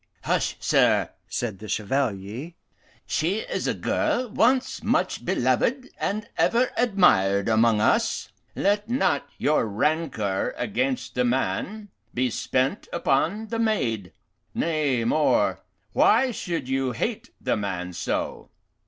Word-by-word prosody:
"Hush, -, -, 0 dB
sir!" -, -, +3 dB, 0.2 s
said 110 Hz, -6 st, -3 dB
the 110 Hz, -, -9 dB
Chevalier. 110 Hz, -, -2 dB, 0.5 s
"She 185 Hz, +8 st, 0 dB
is -, -, -3 dB
a -, -, 0 dB
girl 250 Hz, -1 st, 0 dB
once 255 Hz, +5 st, +2 dB
much -, -, 0 dB
beloved 260 Hz, +1 st, 0 dB
and 215 Hz, +2 st, -2 dB
ever 245 Hz, +2 st, +3 dB
admired 140 Hz, -, +3 dB
among 110 Hz, -1 st, +4 dB
us. -, -, +1 dB, 0.3 s
Let 205 Hz, +2 st, +1 dB
not 240 Hz, -, +1 dB
your 150 Hz, -6 st, +2 dB
rancour 110 Hz, -4 st, -1 dB
against 255 Hz, +4 st, -1 dB
the 125 Hz, -, +1 dB
man 130 Hz, -, -1 dB, 0.3 s
be 125 Hz, 0 st, +1 dB
spent 130 Hz, +3 st, -1 dB
upon 200 Hz, +11 st, 0 dB
the 230 Hz, 0 st, -2 dB
maid. 115 Hz, -, 0 dB, 0.4 s
Nay, 150 Hz, -7 st, +1 dB
more, 150 Hz, +5 st, +2 dB, 0.3 s
why 265 Hz, -1 st, +4 dB
should 170 Hz, -, -4 dB
you 130 Hz, -1 st, 0 dB
hate 225 Hz, -, -3 dB
the -, -, 0 dB
man 95 Hz, -3 st, -3 dB
so? -, -, -3 dB
140 Hz, 120 wpm, -25 LUFS, -, 0.5 s, among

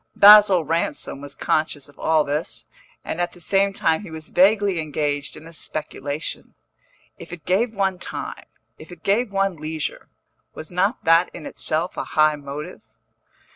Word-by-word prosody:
Basil 200 Hz, -4 st, +8 dB
Ransom 150 Hz, -3 st, -2 dB
was 145 Hz, -1 st, -10 dB
conscious 155 Hz, -2 st, -1 dB
of 145 Hz, -, -19 dB
all 160 Hz, -1 st, +3 dB
this, 150 Hz, +4 st, -3 dB, 0.4 s
and 175 Hz, -, -3 dB
at 175 Hz, 0 st, -2 dB
the 175 Hz, -, -15 dB
same 195 Hz, +3 st, +2 dB
time 160 Hz, -3 st, +1 dB
he 205 Hz, -, -10 dB
was 160 Hz, -1 st, -9 dB
vaguely 195 Hz, 0 st, +3 dB
engaged 145 Hz, -2 st, -2 dB
in 155 Hz, -, -12 dB
a 165 Hz, -, -12 dB
speculation. 150 Hz, -1 st, -5 dB, 0.6 s
If -, -, -11 dB
it 170 Hz, -4 st, -9 dB
gave 220 Hz, +5 st, +1 dB
one 190 Hz, -2 st, 0 dB
time, -, -, -6 dB, 0.3 s
if 155 Hz, -, -13 dB
it 175 Hz, -2 st, -13 dB
gave 215 Hz, +3 st, +1 dB
one 195 Hz, -2 st, 0 dB
leisure, 155 Hz, 0 st, -5 dB, 0.5 s
was 155 Hz, -, -7 dB
not 190 Hz, +6 st, 0 dB
that 165 Hz, +2 st, +4 dB
in 160 Hz, -, -9 dB
itself 160 Hz, +3 st, -1 dB
a -, -, -1 dB
high 155 Hz, 0 st, +5 dB
motive? 145 Hz, +4 st, -8 dB
165 Hz, 165 wpm, -22 LUFS, 155-195 Hz, 0.6 s, Basil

